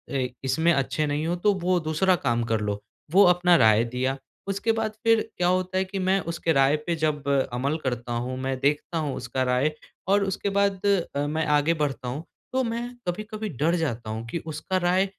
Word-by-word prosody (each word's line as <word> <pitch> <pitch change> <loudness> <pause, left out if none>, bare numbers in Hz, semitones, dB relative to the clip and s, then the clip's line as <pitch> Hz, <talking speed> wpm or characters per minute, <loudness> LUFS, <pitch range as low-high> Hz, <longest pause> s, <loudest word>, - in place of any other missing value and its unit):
इ 130 -2 +1 0.2
इसमें 160 +6 +2
अच्छे 145 +2 0
नहीं 145 +2 -1
हो 175 - 0
तो 205 +3 +2
वो 180 +1 +2
दूसरा 180 +4 +3
काम 120 -7 0
कर 110 - +2
लो, 105 -1 -2 0.3
वो 195 +4 +7
अपना 180 0 +5
राय 110 -1 +5
दिया। 125 +3 -2 0.3
उसके 200 +3 0
बाद 225 -1 -1
फिर 225 -1 +4 0.2
क्या 175 - +2
होता 185 +1 0
है 190 - +3
कि 195 +1 -5
मैं 190 +1 +2
उसके 165 0 -1
राय 135 +1 +4
पे 170 - +1
जब 150 -3 -1 0.3
अमल 140 +6 0
करता 120 -2 -3
हूँ, 125 +2 -2
मैं 130 0 -2
देखता 145 +4 0
हूँ 150 -4 -2
उसका 125 +1 -2
राय 125 +4 +2 0.4
और 200 +1 +4
उसके 195 +1 -2
बाद 200 -1 +1 0.3
अ, 145 +1 0
मैं 155 +1 -1
आगे 150 +3 +3
बढ़ता 135 -4 -2
हूँ। 135 +6 -4 0.3
तो 260 0 +2
मैं 230 0 -2 0.2
कभी-कभी 215 +3 -4
डर 155 +4 +1
जाता 120 -9 -2
हूँ 110 +1 -4
कि 140 - -3
उसका 160 +4 -2
राय 185 +2 +3
155 Hz, 205 wpm, -25 LUFS, 130-185 Hz, 0.4 s, वो